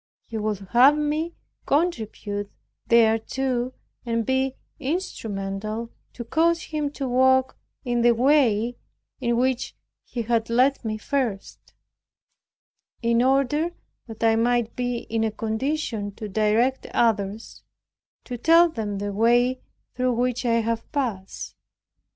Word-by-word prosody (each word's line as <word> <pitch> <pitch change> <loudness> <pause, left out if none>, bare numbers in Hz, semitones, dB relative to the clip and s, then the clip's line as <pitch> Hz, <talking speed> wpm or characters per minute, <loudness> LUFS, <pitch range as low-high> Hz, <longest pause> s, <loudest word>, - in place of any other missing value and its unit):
He 230 - -9
would 215 -1 -1
have 265 +5 +6
me 305 +3 -1 0.3
contribute 220 - -1 0.4
thereto 240 +3 +2 0.3
and 230 -2 -1
be 265 +1 0 0.2
instrumental 220 - -3 0.2
to 240 - -6
cause 330 +7 +1
him 300 -2 -2
to 275 -2 -3
walk 260 +1 +3 0.3
in 240 -1 0
the 235 0 +5
way 245 -3 +3 0.4
in 240 -3 0
which 255 0 0 0.3
He 235 - -4
had 225 0 0
led 255 +4 +3
me 215 -1 -2
first; 235 -5 -3 1.3
in 235 0 +3
order 275 +6 +2 0.3
that 225 0 -8
I 225 0 +4
might 235 0 +1
be 245 -1 -1
in 225 0 -2
a 220 - +1
condition 220 -1 -2
to 215 - -6
direct 220 +6 +1
others, 215 -2 -1 0.6
to 245 -2 -6
tell 335 +4 +6
them 215 -8 -4
the 205 0 -3
way 240 +4 +3 0.3
through 255 0 0
which 245 +1 0
I 230 0 +3
have 230 0 -3
passed. 225 -10 -4
240 Hz, 125 wpm, -24 LUFS, 220-265 Hz, 1.3 s, have